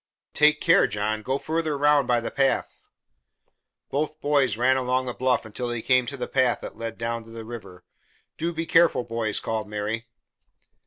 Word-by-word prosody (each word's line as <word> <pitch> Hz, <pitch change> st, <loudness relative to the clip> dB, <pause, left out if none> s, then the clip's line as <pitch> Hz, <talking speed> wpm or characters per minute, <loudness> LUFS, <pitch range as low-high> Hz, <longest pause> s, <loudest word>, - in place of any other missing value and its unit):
"But -, -, -4 dB
take 150 Hz, 0 st, +5 dB
care, 170 Hz, +4 st, +5 dB
John. 105 Hz, +1 st, -2 dB
Go 130 Hz, +5 st, -1 dB
further 160 Hz, -1 st, -2 dB
round 145 Hz, -2 st, +3 dB
by 120 Hz, -1 st, +3 dB
the 115 Hz, -, -4 dB
path." 135 Hz, -1 st, -1 dB, 1.0 s
Both 155 Hz, +2 st, -2 dB
boys 145 Hz, -6 st, +2 dB
ran 130 Hz, +2 st, +3 dB
along 130 Hz, 0 st, 0 dB
the 125 Hz, -, -4 dB
bluff 130 Hz, -1 st, 0 dB
until 110 Hz, +3 st, -4 dB
they 120 Hz, -2 st, -3 dB
came 125 Hz, -1 st, +3 dB
to 140 Hz, 0 st, -5 dB
a -, -, -3 dB
path 130 Hz, -2 st, +1 dB
that -, -, -8 dB
led 115 Hz, 0 st, -6 dB
down 115 Hz, 0 st, -3 dB
to -, -, -15 dB
the 115 Hz, -1 st, -8 dB
river. 110 Hz, -6 st, -10 dB, 0.5 s
"Do 170 Hz, +2 st, -2 dB
be 165 Hz, 0 st, -3 dB
careful, 165 Hz, -5 st, +4 dB
boys!" 115 Hz, -3 st, -2 dB
called 110 Hz, -2 st, -3 dB
Mary. 105 Hz, +2 st, -3 dB
125 Hz, 190 wpm, -25 LUFS, 115-145 Hz, 1.0 s, take